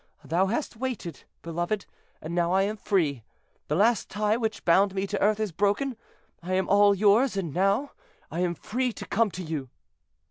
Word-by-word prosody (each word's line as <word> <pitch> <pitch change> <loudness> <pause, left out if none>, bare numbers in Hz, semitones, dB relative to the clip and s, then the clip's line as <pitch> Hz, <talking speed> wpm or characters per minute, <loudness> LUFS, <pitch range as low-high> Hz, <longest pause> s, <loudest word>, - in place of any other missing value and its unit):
Thou 180 +4 +2
hast 235 +3 -3
waited, 225 - -5 0.2
beloved, 175 +5 -2 0.4
and 160 +2 -5
now 175 0 +1
I 190 +1 +4
am 210 +2 -1
free: 160 - 0 0.4
the 150 - 0
last 215 +4 +2
tie 210 +1 +1
which 225 -2 -3
bound 190 +3 +4
me 195 0 0
to 200 0 -3
earth 210 +1 +3
is 215 -3 -1
broken. 205 - 0 0.5
I 180 +2 -4
am 190 - +1
all 205 0 +5
yours, 210 +4 +3
and 170 -7 -3
now 195 +10 +1 0.4
I 165 - -3
am 175 -1 0
free 250 +7 -2
to - - -8
come 225 +1 +1
to 185 0 -7
you." 155 -6 -4
195 Hz, 185 wpm, -27 LUFS, 175-215 Hz, 0.5 s, all